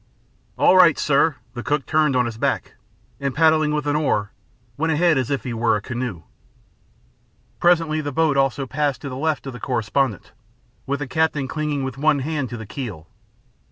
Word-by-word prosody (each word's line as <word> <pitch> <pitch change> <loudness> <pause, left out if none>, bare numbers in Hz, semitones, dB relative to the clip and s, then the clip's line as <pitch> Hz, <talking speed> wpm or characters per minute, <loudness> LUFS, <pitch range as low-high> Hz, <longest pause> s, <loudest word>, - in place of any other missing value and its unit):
"All - - +5
right, 180 -4 +6
sir." 145 +1 +2 0.2
The 120 - -5
cook 145 +2 -1
turned 155 -3 +2
on 125 -1 +3
his 115 -1 -6
back, - - -1 0.5
and, 140 -2 -2
paddling 155 -1 +4
with 150 -1 -1
an 145 0 0
oar, 110 -9 0 0.4
went 160 +4 0
ahead 165 +1 +3
as 130 -3 -1
if 140 -1 -1
he 125 - -4
were 115 -1 +2
a - - 0
canoe. 120 -9 -4 1.4
Presently 165 -3 +3
the 145 -1 -4
boat 155 +1 +2
also 135 0 +1
passed 145 +1 -1
to 140 - -5
the 130 - -6
left 155 +2 -1
of 135 - -6
the 125 - -9
correspondent 120 -2 -1 0.6
with 140 +1 -2
the 145 - -3
captain 155 -1 0
clinging 150 -1 -2
with 130 0 -5
one 155 0 +3
hand 145 -1 -2
to 120 - -6
the 110 - -8
keel. 105 - -7
140 Hz, 190 wpm, -22 LUFS, 125-155 Hz, 1.4 s, right